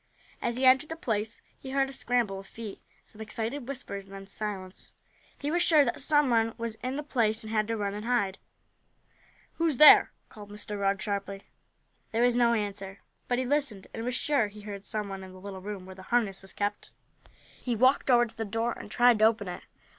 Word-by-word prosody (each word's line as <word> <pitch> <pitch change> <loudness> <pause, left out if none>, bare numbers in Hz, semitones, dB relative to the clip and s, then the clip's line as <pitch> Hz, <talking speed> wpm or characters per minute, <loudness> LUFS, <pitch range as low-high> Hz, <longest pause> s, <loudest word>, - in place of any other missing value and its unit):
As 235 - -1
he 260 - +1
entered 265 +4 +5
the 325 - -4
place 220 -6 -3 0.2
he 265 - -9
heard 270 0 +1
a 270 - -8
scramble 240 -7 0
of 195 - -12
feet, 225 -3 -9 0.2
some 215 - -14
excited 230 +4 -4
whispers, 250 -8 -5
and 195 0 -12
then 195 0 -9
silence. 195 -2 -6 0.4
He 290 +1 -3
was 345 +1 +1
sure 310 -4 +5
that 240 - -2
some 295 -4 +3
one 225 -1 +2
was 230 -1 -3
in 255 +1 -3
the 295 - -3
place 225 -6 +1
and 220 0 -6
had 215 0 +1
run 205 -3 -1
to 210 - -5
hide. 210 -5 0 1.2
"Who's 325 -5 +1
there?" 305 - +9 0.2
called 205 -1 -12
Mr. 210 0 -6
Rugg 195 0 0
sharply. 200 -1 -4 0.7
There 230 +2 +1
was 245 -1 +4
no 235 -1 +4
answer, 195 -2 -4 0.3
but 245 - +1
he 255 - 0
listened 250 -8 0
and 225 - -5
was 250 +1 -2
sure 275 -5 +1
he 210 +1 -12
heard 205 -1 -8
some 210 -1 -2
one 195 -1 -6
in 185 0 -11
the 185 - -12
little 195 0 -8
room 200 -1 -6
where 190 - -10
the 190 - -12
harness 215 -2 0
was 195 - -12
kept. 205 0 -3 0.7
He 245 -2 -1
walked 260 +4 +3
over 240 -1 +6
to 230 - -13
the 225 - -3
door, 225 +3 -1
and - - -10
tried 240 0 +4
to 215 - +6
open 220 -3 +2
it. 180 - -6
220 Hz, 215 wpm, -28 LUFS, 200-250 Hz, 1.2 s, there